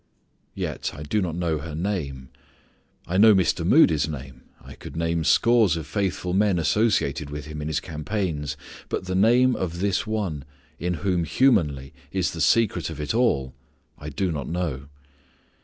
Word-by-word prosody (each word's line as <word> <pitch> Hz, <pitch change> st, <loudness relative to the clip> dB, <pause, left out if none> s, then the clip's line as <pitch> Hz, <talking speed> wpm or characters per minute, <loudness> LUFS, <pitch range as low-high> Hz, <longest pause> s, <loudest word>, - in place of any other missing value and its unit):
Yet -, -, -3 dB
I 75 Hz, -, -7 dB
do 100 Hz, +8 st, 0 dB
not 85 Hz, -4 st, -2 dB
know 85 Hz, -3 st, -1 dB
her 75 Hz, +1 st, -7 dB
name. 75 Hz, -8 st, -3 dB, 0.8 s
I 90 Hz, +2 st, -1 dB
know 110 Hz, 0 st, +8 dB
Mr. 90 Hz, -2 st, +1 dB
Moody's 80 Hz, -, +4 dB
name. 65 Hz, -3 st, -8 dB, 0.2 s
I -, -, -12 dB
could -, -, -10 dB
name 85 Hz, 0 st, 0 dB
scores 115 Hz, -1 st, +4 dB
of 80 Hz, -, -5 dB
faithful 90 Hz, 0 st, -2 dB
men 100 Hz, -1 st, +2 dB
associated 85 Hz, -2 st, +1 dB
with 75 Hz, -1 st, -6 dB
him 75 Hz, 0 st, -7 dB
in 75 Hz, -, -4 dB
his 80 Hz, -1 st, 0 dB
campaigns, 75 Hz, -, -3 dB, 0.3 s
but -, -, -3 dB
the 95 Hz, -, -3 dB
name 120 Hz, +6 st, +4 dB
of 85 Hz, -2 st, -3 dB
this 100 Hz, +1 st, 0 dB
one 100 Hz, -10 st, -2 dB, 0.4 s
in 90 Hz, 0 st, -1 dB
whom 90 Hz, -3 st, +1 dB
humanly 80 Hz, -, +2 dB, 0.2 s
is 90 Hz, -5 st, 0 dB
the 80 Hz, -, -5 dB
secret 95 Hz, -1 st, +2 dB
of 80 Hz, -2 st, -7 dB
it 75 Hz, +5 st, -2 dB
all 75 Hz, -, +1 dB, 0.4 s
I 75 Hz, -, -8 dB
do 90 Hz, +5 st, -1 dB
not 70 Hz, -5 st, -4 dB
know. 80 Hz, -6 st, -3 dB
85 Hz, 170 wpm, -24 LUFS, 75-100 Hz, 0.8 s, know